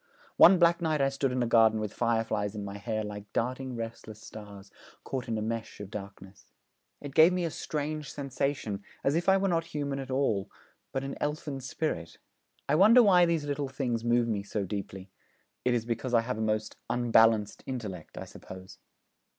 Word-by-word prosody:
One 185 Hz, +1 st, +8 dB
black 170 Hz, 0 st, +4 dB
night 155 Hz, -2 st, +1 dB
I 135 Hz, 0 st, +3 dB
stood 135 Hz, -1 st, -1 dB
in 125 Hz, -1 st, 0 dB
a -, -, +1 dB
garden 115 Hz, -1 st, +4 dB
with 105 Hz, -1 st, -4 dB
fireflies 115 Hz, -3 st, 0 dB
in 105 Hz, -1 st, -5 dB
my 100 Hz, 0 st, -7 dB
hair 110 Hz, +1 st, -2 dB
like 105 Hz, 0 st, -8 dB
darting 130 Hz, +2 st, -2 dB
restless 115 Hz, -2 st, -7 dB
stars 100 Hz, -2 st, -11 dB, 0.3 s
caught 130 Hz, -2 st, -4 dB
in 115 Hz, -1 st, -1 dB
a 105 Hz, -, -2 dB
mesh 115 Hz, 0 st, -4 dB
of 100 Hz, -1 st, -8 dB
darkness. 100 Hz, -1 st, -9 dB, 0.6 s
It 145 Hz, -2 st, -7 dB
gave 160 Hz, +4 st, +7 dB
me 180 Hz, -1 st, 0 dB
a 165 Hz, -, -2 dB
strange 150 Hz, 0 st, -4 dB
sensation, 135 Hz, -7 st, -3 dB, 0.2 s
as 135 Hz, -, +2 dB
if 175 Hz, +3 st, +1 dB
I 190 Hz, -, +6 dB
were 195 Hz, 0 st, +1 dB
not 165 Hz, -3 st, +1 dB
human 145 Hz, -4 st, -3 dB
at 135 Hz, 0 st, -6 dB
all, 120 Hz, -7 st, 0 dB, 0.4 s
but 135 Hz, -, -2 dB
an 135 Hz, 0 st, -5 dB
elfin 150 Hz, -2 st, -3 dB
spirit. 130 Hz, -, -4 dB, 0.5 s
I 140 Hz, -, +1 dB
wonder 215 Hz, +9 st, +7 dB
why 180 Hz, -4 st, +6 dB
these 165 Hz, -3 st, 0 dB
little 145 Hz, -1 st, -2 dB
things 125 Hz, -4 st, -2 dB
move 120 Hz, 0 st, +2 dB
me 105 Hz, -3 st, -1 dB
so 100 Hz, +1 st, -3 dB
deeply? 95 Hz, -1 st, -6 dB, 0.5 s
It 125 Hz, -1 st, +2 dB
is 115 Hz, -2 st, -1 dB
because 120 Hz, +1 st, -1 dB
I 115 Hz, -, +5 dB
have 115 Hz, -1 st, -4 dB
a -, -, -2 dB
most 110 Hz, 0 st, -1 dB
"unbalanced 115 Hz, -3 st, +3 dB
intellect," 105 Hz, -10 st, -6 dB
I -, -, -5 dB
suppose.' 95 Hz, 0 st, -12 dB
120 Hz, 190 wpm, -29 LUFS, 105-145 Hz, 0.6 s, One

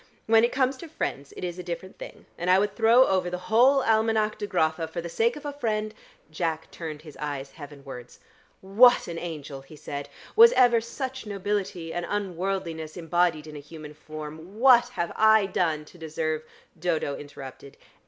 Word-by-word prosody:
When 225 Hz, 0 st, +5 dB
it 235 Hz, -, +3 dB
comes 260 Hz, 0 st, +1 dB
to 335 Hz, -, -9 dB
friends 140 Hz, -, -4 dB
it -, -, -7 dB
is 175 Hz, 0 st, -4 dB
a -, -, -5 dB
different 175 Hz, +2 st, -7 dB
thing, -, -, -10 dB
and 175 Hz, +1 st, -3 dB
I 185 Hz, -, +6 dB
would 205 Hz, +1 st, 0 dB
throw 235 Hz, +3 st, +6 dB
over 185 Hz, -4 st, +1 dB
the 180 Hz, -, -3 dB
whole 260 Hz, +4 st, +5 dB
Almanack 220 Hz, -1 st, +1 dB
of 205 Hz, -, -3 dB
Grotha 160 Hz, +1 st, 0 dB
for 160 Hz, +2 st, -6 dB
the 170 Hz, 0 st, -5 dB
sake 225 Hz, +8 st, +1 dB
of 295 Hz, -, -10 dB
a 290 Hz, -, -4 dB
friend 215 Hz, -6 st, -2 dB, 0.2 s
" -, -, -33 dB
Jack 160 Hz, -2 st, -3 dB
turned 155 Hz, -3 st, -7 dB
his 155 Hz, -3 st, -12 dB
eyes 140 Hz, -2 st, -5 dB
heavenwards. 140 Hz, -4 st, -11 dB, 0.4 s
"What 215 Hz, +6 st, +5 dB
an 170 Hz, -1 st, -5 dB
angel!" 150 Hz, -5 st, -7 dB
he 135 Hz, +3 st, -14 dB
said. 145 Hz, -1 st, -6 dB, 0.3 s
"Was 465 Hz, +2 st, +8 dB
ever 240 Hz, -, +5 dB
such 260 Hz, +1 st, -6 dB
nobility 195 Hz, -4 st, -3 dB
and 175 Hz, -1 st, -3 dB
unworldliness 185 Hz, -5 st, -3 dB
embodied 170 Hz, -2 st, +1 dB
in 155 Hz, -1 st, -10 dB
a -, -, -6 dB
human 150 Hz, 0 st, -11 dB
form? 155 Hz, +5 st, -9 dB
What 245 Hz, -1 st, +6 dB
have 170 Hz, -9 st, -3 dB
I 220 Hz, -1 st, +5 dB
done 160 Hz, -5 st, -1 dB
to 175 Hz, -, -17 dB
deserve 155 Hz, -1 st, -2 dB, 0.2 s
" 170 Hz, -, -31 dB
Dodo 160 Hz, -4 st, -1 dB
interrupted. 140 Hz, -1 st, -11 dB
175 Hz, 190 wpm, -26 LUFS, 155-220 Hz, 0.4 s, Was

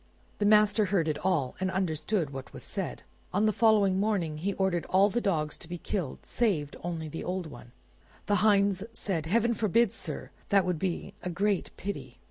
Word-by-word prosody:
The 205 Hz, -, +3 dB
master 210 Hz, 0 st, +5 dB
heard 185 Hz, -4 st, +1 dB
it 155 Hz, -, -2 dB
all, 150 Hz, -9 st, +1 dB
and 190 Hz, 0 st, 0 dB
understood 175 Hz, -2 st, -1 dB
what 135 Hz, -1 st, -8 dB
was -, -, -8 dB
said. -, -, -4 dB, 0.3 s
On 200 Hz, +4 st, +2 dB
the 215 Hz, -, +3 dB
following 205 Hz, -4 st, +4 dB
morning 190 Hz, -7 st, 0 dB
he 195 Hz, +5 st, -1 dB
ordered 190 Hz, -3 st, 0 dB
all 195 Hz, +2 st, +4 dB
the 240 Hz, -, 0 dB
dogs 155 Hz, -8 st, -1 dB
to 175 Hz, -, -9 dB
be 175 Hz, -, -4 dB
killed 175 Hz, -5 st, -4 dB
save 170 Hz, -12 st, 0 dB
only 165 Hz, -2 st, -3 dB
the 160 Hz, +2 st, -6 dB
old 180 Hz, 0 st, -2 dB
one. 120 Hz, -5 st, -11 dB, 0.5 s
The 205 Hz, -, +2 dB
hinds 200 Hz, -2 st, +3 dB
said, 170 Hz, -8 st, -2 dB
"Heaven 230 Hz, +5 st, +3 dB
forbid, 225 Hz, 0 st, +2 dB
sir; -, -, -5 dB, 0.2 s
that 195 Hz, -3 st, +4 dB
would 180 Hz, -3 st, -1 dB
be 185 Hz, -1 st, -3 dB
a 180 Hz, -, -3 dB
great 195 Hz, +2 st, 0 dB
pity!" 200 Hz, +1 st, -6 dB
190 Hz, 190 wpm, -29 LUFS, 165-205 Hz, 0.5 s, master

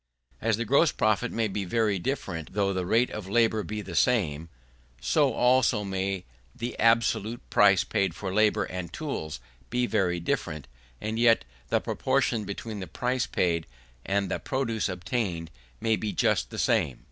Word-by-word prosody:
As 110 Hz, -2 st, +1 dB
the 120 Hz, -, -2 dB
gross 140 Hz, +7 st, +4 dB
profit 110 Hz, +3 st, +1 dB
may 115 Hz, -1 st, 0 dB
be 100 Hz, 0 st, -3 dB
very 105 Hz, 0 st, +1 dB
different 85 Hz, -, -4 dB
though 100 Hz, -1 st, +1 dB
the 90 Hz, -1 st, -2 dB
rate 115 Hz, +5 st, +3 dB
of 105 Hz, -3 st, -5 dB
profit 110 Hz, 0 st, +2 dB
be 105 Hz, 0 st, -4 dB
the 90 Hz, -2 st, -8 dB
same; 85 Hz, -11 st, +1 dB, 0.5 s
so 145 Hz, -4 st, +2 dB
also 125 Hz, -2 st, +3 dB
may 95 Hz, -2 st, -2 dB, 0.3 s
the 120 Hz, +1 st, -4 dB
absolute 115 Hz, 0 st, +2 dB
price 100 Hz, -2 st, +5 dB
paid 95 Hz, -4 st, 0 dB
for 95 Hz, -2 st, -4 dB
labour 105 Hz, +1 st, +3 dB
and 90 Hz, -2 st, -5 dB
tools 135 Hz, -, -4 dB, 0.3 s
be 125 Hz, +1 st, +1 dB
very 95 Hz, -7 st, +1 dB
different, 75 Hz, -4 st, -2 dB, 0.3 s
and 110 Hz, +1 st, -3 dB
yet 115 Hz, -, +4 dB, 0.2 s
the -, -, +3 dB
proportion 125 Hz, -5 st, 0 dB
between 105 Hz, +2 st, -5 dB
the 95 Hz, -, -6 dB
price 125 Hz, 0 st, -1 dB
paid 85 Hz, -3 st, 0 dB, 0.4 s
and 100 Hz, -1 st, 0 dB
the -, -, -1 dB
produce 115 Hz, -6 st, -1 dB
obtained 90 Hz, -2 st, -3 dB, 0.3 s
may 110 Hz, 0 st, +2 dB
be 105 Hz, -1 st, -3 dB
just 90 Hz, -, +1 dB
the -, -, -8 dB
same. 65 Hz, -, +1 dB
105 Hz, 165 wpm, -27 LUFS, 95-115 Hz, 0.5 s, price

